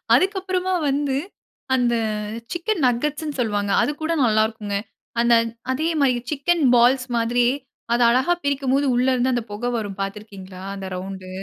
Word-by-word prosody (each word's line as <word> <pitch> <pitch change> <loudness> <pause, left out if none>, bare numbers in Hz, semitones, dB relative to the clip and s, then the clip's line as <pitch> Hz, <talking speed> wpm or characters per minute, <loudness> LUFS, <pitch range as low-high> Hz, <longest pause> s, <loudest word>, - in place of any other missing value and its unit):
அதுக்கப்புறமா 375 -1 +1 0.2
வந்து, 280 -1 0 0.6
அந்த 245 -2 +2 0.6
சிக்கன் 350 +1 -1
நகெட்ஸ்ன்னு 300 +4 -2
சொல்லுவாங்க. 205 -3 0
அது - - +1
கூட 320 +1 0
நல்லா 215 -2 +3
இருக்கும். 210 -2 -5 0.4
அந்த 235 0 +4 0.4
அதே 300 +5 0
மாரி 270 -3 +4 0.2
சிக்கன் 310 +2 +1
பால்ஸ் 250 +2 +4
மாதிரி 235 +1 +2 0.5
அத 240 - +2
அழகா 260 +8 +3
பிரிக்கும் 275 -2 0
போது 280 +1 +2
உள்ள 250 +2 +2
இருந்து 255 +1 +1
அந்த 240 - 0
புகை 225 +4 -3
வரும் 205 -4 -4
பார்த்து 195 +1 -3
இருக்கீங்களா? 190 -3 -11
அந்த 195 -1 -6
ரவுண்டு 185 0 -6
245 Hz, 150 wpm, -22 LUFS, 215-285 Hz, 0.6 s, அந்த